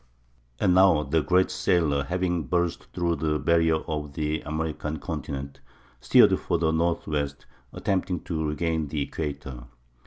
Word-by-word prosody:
And 90 - +3
now 90 -5 +5
the 80 +1 +1
great 90 +4 +2
sailor, 80 -7 +1
having 90 -4 -1
burst 85 +2 -1
through 85 -2 -1
the 75 +1 0
barrier 80 +2 +3
of 75 -2 -4
the 75 +1 -2
American 80 0 -3
continent, 70 -1 -6 0.4
steered - - +5
for - - -1
the 80 -1 +1
northwest, 75 -3 -1 0.3
attempting 95 -3 -1
to 80 -2 -3
regain 80 +1 -1
the 75 0 -2
equator. 70 -5 -6
80 Hz, 135 wpm, -26 LUFS, 75-85 Hz, 0.4 s, now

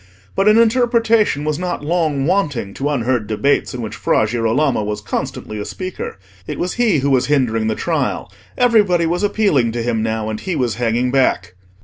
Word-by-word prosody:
But 195 +1 +2
an 215 +1 +6
interpretation 230 - +3
was 155 0 -1
not 180 -5 -3
long 155 -4 0
wanting 145 - 0
to 140 +6 -2
unheard 125 -5 0
debates 125 +5 0
in 120 - -5
which 110 - -6
Fra - - +1
Girolamo 115 +4 +1
was 105 0 -3
constantly 105 +1 -5
a - - -3
speaker: 185 - -6 0.3
it - - -4
was 180 - -2
he 230 -8 +2
who 140 +1 +1
was 130 -2 +2
hindering 120 -6 +1
the 110 - 0
trial; - - -2 0.2
everybody 210 -8 +3
was 175 +2 -1
appealing 200 - +2
to 120 -1 -2
him 115 -2 -1
now, 110 -1 -2
and 110 -1 -4
he 185 - -3
was 125 -6 0
hanging 120 +2 +1
back. 100 -9 +1
140 Hz, 190 wpm, -18 LUFS, 115-180 Hz, 0.3 s, an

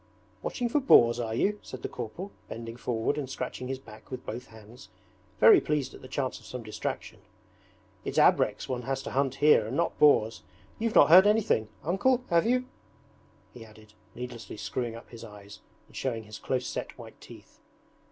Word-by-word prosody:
'Watching 245 - -2
for 265 +5 +1
boars, 120 - +5
are 115 -2 -2
you?' 210 - 0
said 130 - -10
the - - -1
corporal, 125 - -7 0.2
bending 115 0 -7
forward 120 +3 -1
and 135 -3 -5
scratching 130 -1 -5
his 135 0 -3
back 110 -5 -15
with 130 -1 -7
both 120 +3 -6
hands, 110 +3 -15 0.5
very 420 -5 +8
pleased 145 -4 -2
at - - -12
the 130 - -10
chance 130 0 -3
of - - -18
some 125 -2 -7
distraction. 110 -1 -5 0.8
'It's - - -5
abreks - - +3
one 125 -1 -3
has 135 +2 -3
to - - -6
hunt 135 0 0
here 145 -7 +4
and 125 - -3
not 170 - -1
boars! 115 -7 +4 0.4
You've 225 0 -1
not - - +7
heard 185 +4 +9
anything, 205 - +2
Uncle, 220 - +1
have 170 +5 +3
you?' 250 +1 +1 0.9
he 120 - -11
added, 110 -1 -17 0.2
needlessly 120 -3 -8
screwing 115 +3 -4
up 115 - -11
his 115 -1 -10
eyes 105 -2 -12 0.3
and - - -21
showing 115 -4 -3
his 105 0 -10
close 130 -1 -2
set - - -5
white - - -13
teeth. - - -15
125 Hz, 185 wpm, -28 LUFS, 115-150 Hz, 0.9 s, heard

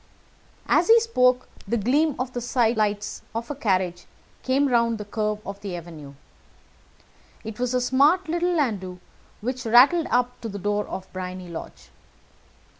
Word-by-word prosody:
As 340 - +3
he 460 +1 +8
spoke, 255 - +2 0.2
the 235 - 0
gleam 280 +7 +2
of 255 0 -4
the 245 - -3
sidelights 220 -4 0
of 230 +4 -4
a - - -4
carriage 185 -7 -1 0.3
came 270 +2 +2
round 235 -2 +2
the 210 - -7
curve 210 0 -3
of 200 0 -7
the 195 -3 -5
avenue. 155 -5 -10 1.3
It 220 0 -8
was 250 0 -1
a 250 - +2
smart 285 +9 +3
little 345 +2 0
landau 200 - -1 0.4
which 255 +3 -3
rattled 260 +9 +5
up 250 0 0
to 230 - -5
the 200 - -6
door 205 +1 -1
of 190 - -6
Briony 185 -1 -6
Lodge. 165 - -9
235 Hz, 155 wpm, -24 LUFS, 200-260 Hz, 1.3 s, he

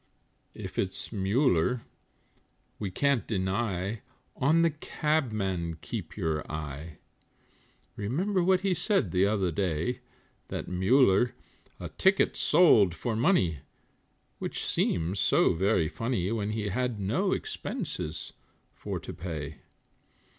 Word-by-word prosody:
If - - -6
it's 95 -1 -1
Muller, 110 - +2 1.0
we 100 - -2
can't 140 +5 +1
deny, 100 0 -1 0.3
on 160 +5 +3
the 165 - +3
Cabman 110 - -1
keep 100 -9 -6
your 80 -5 0
eye, 75 +1 -6 1.0
Remember 180 - 0
what 185 0 +3
he 195 -1 +1
said 195 +2 +1
the 95 +2 +3
other 100 -4 +1
day, 90 +6 -1 0.5
That - - -5
Muller 100 +4 +3 0.4
a - - -6
ticket 190 0 +2
sold 115 - +5
for 115 +2 -2
money, 110 - +2 0.8
which - - -3
seems 90 +3 0
so - - +4
very 95 -1 +2
funny, 115 -2 -2
When 105 -2 -1
he 105 -1 -2
had 125 +1 -1
no 170 - 0
expenses 165 - -4 0.4
for - - -5
to - - -8
pay. 80 -5 -6
105 Hz, 115 wpm, -29 LUFS, 90-135 Hz, 1.0 s, sold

